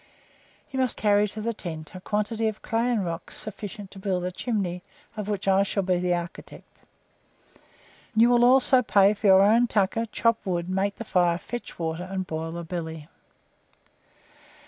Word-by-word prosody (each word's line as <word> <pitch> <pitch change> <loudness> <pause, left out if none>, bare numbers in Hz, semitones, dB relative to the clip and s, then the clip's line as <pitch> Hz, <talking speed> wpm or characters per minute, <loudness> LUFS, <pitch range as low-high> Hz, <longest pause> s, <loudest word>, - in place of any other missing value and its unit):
You 265 - -3
must 255 -3 0
carry 210 0 +3
to 215 +2 -7
the 230 +2 -1
tent 160 -7 -7
a 185 - -9
quantity 215 +3 -1
of 215 -1 -4
clay 230 +2 0
and 215 -6 0
rocks 170 0 -5
sufficient 205 -1 -7
to 195 - -11
build 190 -2 -1
a 180 - -2
chimney, 185 -4 -2 0.3
of 210 -1 -5
which 205 -1 -3
I 195 0 +5
shall 200 0 0
be 180 -1 +1
the 180 0 +1
architect. 170 0 -9 1.3
You 230 +2 +5
will 240 0 +4
also 255 +1 +5
pay 200 -3 +4
for 210 0 -1
your 190 0 +7
own 230 +4 +4
tucker, 220 +2 0
chop 230 -1 +1
wood, 175 -2 -2
make 195 +2 0
the - - -6
fire, 175 -4 +2
fetch 240 +6 -7
water, 165 +2 -3
and 190 -1 -3
boil 160 -1 -4
the 170 0 -5
billy." 160 -2 -6
200 Hz, 175 wpm, -26 LUFS, 180-220 Hz, 1.3 s, your